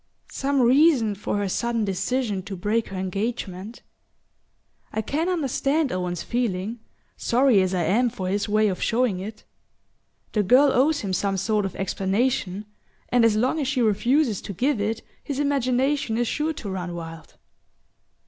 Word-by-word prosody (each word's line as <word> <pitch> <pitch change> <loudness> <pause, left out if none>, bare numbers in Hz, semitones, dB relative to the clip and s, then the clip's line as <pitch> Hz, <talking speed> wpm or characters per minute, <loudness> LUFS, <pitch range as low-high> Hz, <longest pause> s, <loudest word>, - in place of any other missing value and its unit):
"Some 275 0 0
reason 255 -3 +4
for 205 +1 -3
her 205 -1 -1
sudden 230 +3 -1
decision 200 +2 -1
to 200 - -5
break 210 +5 0
her 195 - -6
engagement. 195 +2 -4 1.1
I 220 - -2
can 315 - -1
understand 295 -2 0
Owen's 180 -2 -2
feeling, 230 -2 -2 0.4
sorry 245 -4 +3
as 185 0 0
I 175 - +1
am 240 +8 +2
for 195 -6 -5
his 200 +2 -1
way 215 +1 +3
of 190 -3 -2
showing 235 -5 +1
it. 215 +3 -8 0.9
The 210 - +1
girl 260 +8 +5
owes 290 +4 +3
him 195 -2 -3
some 195 +1 0
sort 210 +1 0
of 195 - -5
explanation, 195 +1 -1 0.4
and 245 -1 +3
as 225 -2 +4
long 255 +8 +1
as 280 - -1
she 260 -3 +1
refuses 235 +2 +2
to 200 - -6
give 250 - 0
it 220 +2 -2 0.2
his 280 - -4
imagination 270 -3 +1
is 240 0 +1
sure 310 +6 -1
to 220 -8 -7
run 180 -2 -4
wild." 165 -1 -9
220 Hz, 160 wpm, -24 LUFS, 195-255 Hz, 1.1 s, girl